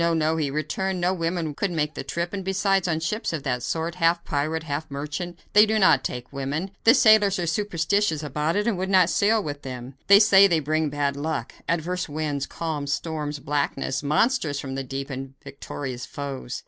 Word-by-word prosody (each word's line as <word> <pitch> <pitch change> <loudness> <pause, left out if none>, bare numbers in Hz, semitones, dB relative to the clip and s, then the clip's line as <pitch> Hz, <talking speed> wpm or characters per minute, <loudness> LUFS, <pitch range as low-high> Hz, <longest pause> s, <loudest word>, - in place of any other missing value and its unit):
no!" 160 0 +1
he 155 -3 -1
returned; 185 +6 -2
"no 180 +1 +1
woman 165 -3 -2
could 200 +7 -1
make 155 -3 -1
the - - -5
trip, 170 +6 -3
and, 195 -1 -3
besides, 195 0 +1
on 160 -2 0
ships 210 +7 -2
of 160 -4 -4
that 125 -3 -1
sort, 165 +6 -2
half 170 -1 +1
pirate, 155 +2 -1
half 155 0 -4
merchant, 150 +5 -5 0.2
they 210 - +8
do 220 0 +1
not 185 -10 +5
take 125 +2 -5
women. 145 +7 -3
The 230 +3 +8
sailors 215 -5 +5
are 175 - -1
superstitious 170 -1 0
about 150 +3 -1
it 205 +1 +1
and 220 -6 0
will 190 - -1
not 185 -2 +4
sail 215 +1 +2
with 145 -3 -5
them. 125 0 -7
They 200 0 +8
say 200 -2 +7
they 170 -4 +2
bring 155 +1 0
bad 140 -1 -1
luck 145 -4 -3 0.2
adverse 175 +2 -1
winds, 145 -2 -2
calms, 150 -4 -4
storms, 150 -1 -3
blackness, 140 -1 -2
monsters 155 - +1
from 135 -1 -5
the 135 0 -3
deep 135 +2 -5
and 135 0 -6
victorious 135 -2 -6
foes." 135 -3 -5
160 Hz, 200 wpm, -24 LUFS, 140-185 Hz, 0.2 s, they